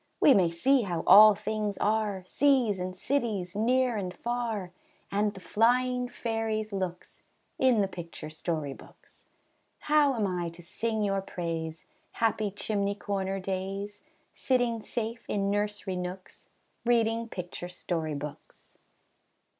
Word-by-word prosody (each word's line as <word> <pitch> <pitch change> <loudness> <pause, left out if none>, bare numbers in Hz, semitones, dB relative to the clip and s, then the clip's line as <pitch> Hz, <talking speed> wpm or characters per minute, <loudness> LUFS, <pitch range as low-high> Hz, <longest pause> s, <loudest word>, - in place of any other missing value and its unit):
We 280 - +7
may 185 -7 +4
see 255 +11 +3
how 175 -6 -2
all 215 0 +9
things 210 -1 -2
are, 210 -3 0
Seas 255 -4 +2
and 185 0 -4
cities, 205 -6 -1
near 245 +2 +2
and 185 -3 -3
far, 225 -3 -3 0.4
And 205 +1 +1
the - - -8
flying 250 +5 +2
fairies' 220 -2 -2
looks, 185 -2 -5 0.4
In 255 -5 +4
the 195 - +2
picture 170 -4 -8
story 155 -3 -3
books. - - -18 0.6
How 295 -3 +3
am 220 -3 0
I 180 -3 -2
to 170 +1 -13
sing 220 +5 -2
your 195 -1 +1
praise, 165 -3 -4 0.3
Happy 220 -2 +1
chimney 200 0 -1
corner 195 -1 -2
days, 195 +2 -4 0.3
Sitting 245 -3 +1
safe 230 +1 -4
in 200 -1 0
nursery 205 -2 -2
nooks, 180 +1 -7 0.4
Reading 230 -1 +2
picture 175 -2 -6
story 165 -4 -3
books? 145 +1 -9
205 Hz, 130 wpm, -29 LUFS, 185-230 Hz, 0.6 s, all